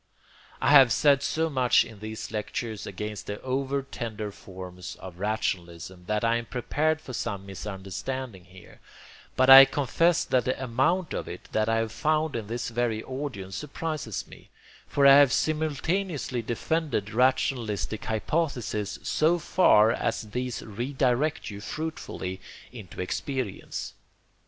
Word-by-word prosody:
I -, -, +2 dB
have 135 Hz, -5 st, +8 dB
said 140 Hz, +3 st, +4 dB
so 160 Hz, +3 st, 0 dB
much 130 Hz, -5 st, +3 dB
in 110 Hz, -3 st, -12 dB
these 110 Hz, 0 st, -6 dB
lectures 110 Hz, 0 st, -4 dB
against 105 Hz, +2 st, -6 dB
the 105 Hz, 0 st, -4 dB
over 135 Hz, +1 st, -1 dB
tender 110 Hz, -6 st, -5 dB
forms 90 Hz, -2 st, -9 dB
of 90 Hz, -2 st, -11 dB
rationalism, 90 Hz, -4 st, -3 dB
that 105 Hz, +1 st, 0 dB
I 115 Hz, 0 st, +3 dB
am 120 Hz, -, -6 dB
prepared 150 Hz, +5 st, 0 dB
for 135 Hz, -5 st, -9 dB
some 100 Hz, -4 st, -3 dB
misunderstanding 100 Hz, +3 st, -6 dB
here, 90 Hz, 0 st, -16 dB, 0.6 s
but 130 Hz, -, +3 dB
I 135 Hz, 0 st, +12 dB
confess 160 Hz, +5 st, +1 dB
that 125 Hz, -2 st, +1 dB
the 130 Hz, -, -1 dB
amount 135 Hz, +9 st, +1 dB
of -, -, -4 dB
it -, -, -9 dB
that 110 Hz, 0 st, +1 dB
I 115 Hz, -, +2 dB
have 115 Hz, -1 st, -1 dB
found 155 Hz, +4 st, 0 dB
in 110 Hz, -3 st, -4 dB
this 120 Hz, +2 st, -3 dB
very 115 Hz, -2 st, -1 dB
audience 130 Hz, -9 st, -5 dB
surprises 150 Hz, -, -4 dB
me, -, -, -15 dB, 0.4 s
for 140 Hz, -, +2 dB
I 140 Hz, 0 st, +9 dB
have 140 Hz, -3 st, +6 dB
simultaneously 155 Hz, -1 st, -1 dB
defended 120 Hz, -2 st, -2 dB
rationalistic 115 Hz, -4 st, 0 dB
hypotheses 110 Hz, -3 st, -2 dB
so 160 Hz, +3 st, +2 dB
far 115 Hz, -10 st, +4 dB
as 115 Hz, -2 st, -2 dB
these 125 Hz, 0 st, -3 dB
re 120 Hz, +6 st, -5 dB
direct 135 Hz, 0 st, 0 dB
you 100 Hz, 0 st, -8 dB
fruitfully 105 Hz, -, -5 dB, 0.3 s
into 110 Hz, -8 st, -10 dB
experience. 125 Hz, +3 st, -4 dB
120 Hz, 140 wpm, -27 LUFS, 105-140 Hz, 0.6 s, I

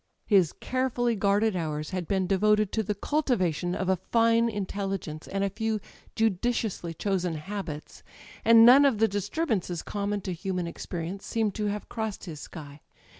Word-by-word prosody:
His 190 Hz, -7 st, +4 dB
carefully 250 Hz, -2 st, -1 dB
guarded 205 Hz, +1 st, +2 dB
hours 155 Hz, -2 st, -3 dB
had 180 Hz, -3 st, -3 dB
been 190 Hz, -2 st, +1 dB
devoted 210 Hz, +2 st, +2 dB
to 220 Hz, -, 0 dB
the 210 Hz, 0 st, -2 dB
cultivation 185 Hz, -, 0 dB
of 190 Hz, -, -2 dB
a 190 Hz, -, +3 dB
fine 230 Hz, +4 st, +2 dB
intelligence 195 Hz, -6 st, -4 dB
and 195 Hz, 0 st, -2 dB
a 200 Hz, -, +1 dB
few 220 Hz, +1 st, -1 dB, 0.4 s
judiciously 220 Hz, -4 st, 0 dB
chosen 180 Hz, -2 st, -1 dB
habits; 155 Hz, -2 st, -6 dB, 0.4 s
and 230 Hz, 0 st, +8 dB
none 260 Hz, +4 st, +9 dB
of 270 Hz, -6 st, +3 dB
the 225 Hz, +1 st, +4 dB
disturbances 205 Hz, -, -2 dB
common 205 Hz, 0 st, -2 dB
to 185 Hz, -, -4 dB
human 180 Hz, 0 st, -3 dB
experience 170 Hz, +2 st, -6 dB
seemed 220 Hz, -3 st, 0 dB
to 210 Hz, +1 st, -2 dB
have 205 Hz, 0 st, -3 dB
crossed 220 Hz, -3 st, -4 dB
his 160 Hz, -5 st, -7 dB
sky. 145 Hz, -1 st, -10 dB
200 Hz, 160 wpm, -27 LUFS, 180-220 Hz, 0.4 s, none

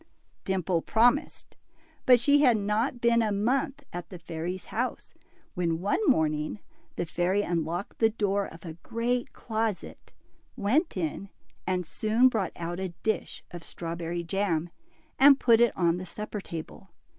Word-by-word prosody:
Dimple 185 Hz, -3 st, 0 dB
promised, 245 Hz, -, +1 dB, 0.5 s
but 250 Hz, -1 st, +8 dB
she 285 Hz, +4 st, +4 dB
had 245 Hz, -6 st, +5 dB
not 215 Hz, +5 st, -1 dB
been 235 Hz, 0 st, +4 dB
a 215 Hz, -2 st, +1 dB
month 255 Hz, +7 st, 0 dB
at 175 Hz, 0 st, -6 dB
the 185 Hz, -, -8 dB
fairy's 170 Hz, +2 st, -5 dB
house, 245 Hz, +3 st, -3 dB, 0.4 s
when 165 Hz, -2 st, -1 dB
one 200 Hz, -, 0 dB
morning, 155 Hz, -, +1 dB, 0.4 s
the 175 Hz, -, -2 dB
fairy 180 Hz, +5 st, 0 dB
un 170 Hz, -2 st, 0 dB
locked 175 Hz, +5 st, -5 dB
the 225 Hz, -, +5 dB
door 205 Hz, -2 st, 0 dB
of 165 Hz, +2 st, -13 dB
a 165 Hz, -, -6 dB
great 240 Hz, +1 st, -1 dB
closet, 220 Hz, -3 st, -4 dB, 0.4 s
went 270 Hz, -, +1 dB
in, 180 Hz, +3 st, -3 dB, 0.4 s
and 180 Hz, -1 st, 0 dB
soon 220 Hz, +9 st, +3 dB
brought 215 Hz, -6 st, -2 dB
out 175 Hz, +1 st, -4 dB
a 185 Hz, -2 st, -4 dB
dish 220 Hz, -, -2 dB
of 175 Hz, -1 st, -8 dB
strawberry 170 Hz, +1 st, -4 dB
jam, 175 Hz, -2 st, -1 dB, 0.5 s
and 275 Hz, 0 st, +8 dB
put 230 Hz, -2 st, +5 dB
it 240 Hz, -, +5 dB
on 170 Hz, -1 st, +2 dB
the 185 Hz, -, -6 dB
supper 210 Hz, +1 st, -5 dB
table. 170 Hz, +3 st, -8 dB
200 Hz, 155 wpm, -28 LUFS, 175-230 Hz, 0.5 s, but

